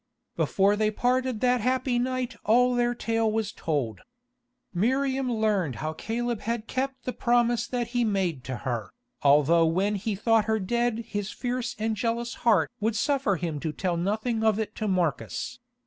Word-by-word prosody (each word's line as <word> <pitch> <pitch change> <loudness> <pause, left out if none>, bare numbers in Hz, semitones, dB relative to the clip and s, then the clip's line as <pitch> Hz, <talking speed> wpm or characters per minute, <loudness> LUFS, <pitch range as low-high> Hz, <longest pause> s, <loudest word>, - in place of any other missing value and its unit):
Before 200 +1 +2
they 215 0 +2
parted 250 +1 0
that 250 -1 +3
happy 255 0 +1
night 255 0 -2
all 250 +3 +4
their 240 0 +1
tale 225 -2 0
was 220 -1 -1
told. 130 - -2 0.7
Miriam 260 +6 +1
learned 210 - +1
how 155 +4 -3
Caleb 235 +5 -2
had 230 -1 -2
kept 265 +1 -3
the 250 - -3
promise 240 -1 +2
that 240 -2 -2
he 245 0 +1
made 190 - 0
to 130 - -3
her, 120 -4 -2 0.3
although 150 +4 +5
when 190 +6 +1
he 210 +1 -2
thought 225 +2 +3
her 220 0 +1
dead 235 +3 -1
his 205 -1 -3
fierce 250 +1 -3
and 220 +1 -1
jealous 235 +2 -1
heart 190 - +3
would 220 +1 0
suffer 265 -4 +1
him 165 -3 -3
to 155 +1 -2
tell 180 +2 -1
nothing 215 +6 -1
of 220 -2 +3
it 220 -1 -3
to 215 - -2
Marcus. 185 - -1
220 Hz, 170 wpm, -27 LUFS, 190-245 Hz, 0.7 s, although